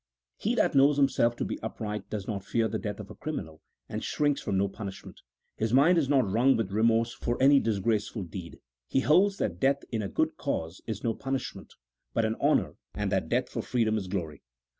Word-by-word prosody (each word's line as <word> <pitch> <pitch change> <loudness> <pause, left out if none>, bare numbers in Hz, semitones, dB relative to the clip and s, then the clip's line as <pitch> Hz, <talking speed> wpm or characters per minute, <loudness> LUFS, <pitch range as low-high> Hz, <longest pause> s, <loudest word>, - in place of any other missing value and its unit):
He - - 0
that - - +2
knows 140 +1 +5
himself 130 -4 +3
to - - -2
be - - -4
upright 105 -2 -5
does 100 -2 -4
not 100 -3 -3
fear 115 +2 +1
the - - -3
death 105 -2 -4
of 105 - -8
a - - -10
criminal, 80 - -6 0.3
and - - -5
shrinks 145 -1 0
from 100 -2 -1
no 100 +1 +2
punishment; 100 -1 -8 0.4
his 110 +2 +1
mind 165 +6 +6
is 140 -4 -1
not 135 -6 +3
wrung 120 +7 +3
with 110 -4 -2
remorse 115 +2 +2
for 120 - -3
any 140 +1 +6
disgraceful 110 -1 -1
deed: 85 0 -8 0.3
he 135 - +1
holds 195 +8 +4
that 85 - -2
death 140 +4 +2
in 110 - -1
a 100 - -3
good - - 0
cause 80 +2 -3
is 110 -2 -4
no 115 - +1
punishment, 135 +2 -5 0.4
but 115 - +2
an 110 - 0
honour, - - +2 0.2
and - - -2
that - - 0
death - - +1
for - - -4
freedom 115 -3 +1
is 100 -4 -2
glory. 85 -6 -4
110 Hz, 210 wpm, -28 LUFS, 100-135 Hz, 0.4 s, mind